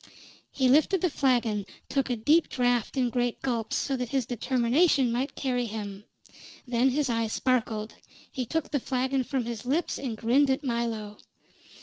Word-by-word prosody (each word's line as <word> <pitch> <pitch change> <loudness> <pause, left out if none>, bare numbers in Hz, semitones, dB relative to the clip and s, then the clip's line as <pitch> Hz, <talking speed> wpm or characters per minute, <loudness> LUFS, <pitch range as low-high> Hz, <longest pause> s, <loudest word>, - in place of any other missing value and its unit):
He 265 -2 +1
lifted 310 +7 +4
the 360 - +1
flagon, 240 -7 +1 0.2
took 275 -1 -1
a 245 - +1
deep 300 +9 +3
draft 245 0 0
in 250 -2 +1
great 245 -1 -1
gulps, 235 -4 -1
so 275 - 0
that 250 -2 -3
his 265 -2 0
determination 255 - +2
might 255 +4 -2
carry 245 -3 -1
him; 205 -2 -6 0.6
then 245 +2 +2
his 285 +2 0
eye 230 -2 0
sparkled, 220 -2 -1 0.4
he 255 -3 -4
took 320 +4 -2
the 285 - +1
flagon 260 +1 0
from 260 -2 -2
his 235 -3 -5
lips, 290 +7 -1
and 245 -5 -4
grinned 260 +6 +3
at 265 +3 0
Milo. 230 -4 -3
250 Hz, 170 wpm, -27 LUFS, 230-270 Hz, 0.6 s, lifted